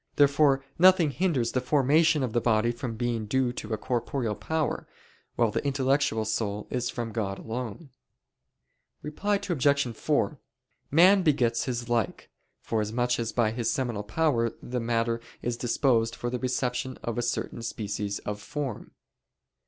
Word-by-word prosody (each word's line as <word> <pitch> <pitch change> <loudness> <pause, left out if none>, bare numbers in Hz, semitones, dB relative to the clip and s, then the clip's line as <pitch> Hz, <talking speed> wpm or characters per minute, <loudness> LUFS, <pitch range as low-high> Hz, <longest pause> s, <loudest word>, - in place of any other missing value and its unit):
Therefore 140 -1 +4
nothing 180 -4 +6
hinders 145 -9 0
the 130 - 0
formation 150 +3 +3
of 120 -4 -2
the 120 - +2
body 115 0 +2
from 120 -1 -5
being 115 -2 -2
due 130 +1 +1
to 115 -2 -7
a 110 - 0
corporeal 120 0 -2
power, 160 +8 -2 0.5
while 115 -3 +2
the - - -2
intellectual 135 -4 +1
soul 105 -1 -2
is 125 -1 -1
from 115 -2 -4
God 100 -3 -2
alone. 125 +5 -6 1.1
Reply 195 +8 -1
Obj. 140 - +1
4: - - 0 0.5
Man 185 +6 +6
begets 125 -8 +2
his 120 -3 -3
like, 115 -4 -1 0.3
forasmuch 115 +3 0
as 115 -1 -2
by 115 -3 +1
his 115 0 -1
seminal 125 -7 -1
power 115 +2 +1
the 125 +1 -4
matter 115 0 0 0.2
is 120 0 -1
disposed 120 -1 +1
for 120 - -4
the 125 - -2
reception 130 0 -2
of 115 0 -2
a - - +1
certain 120 0 -2
species 105 -3 -3
of 105 0 -4
form. 140 -5 -5
120 Hz, 150 wpm, -27 LUFS, 115-140 Hz, 1.1 s, nothing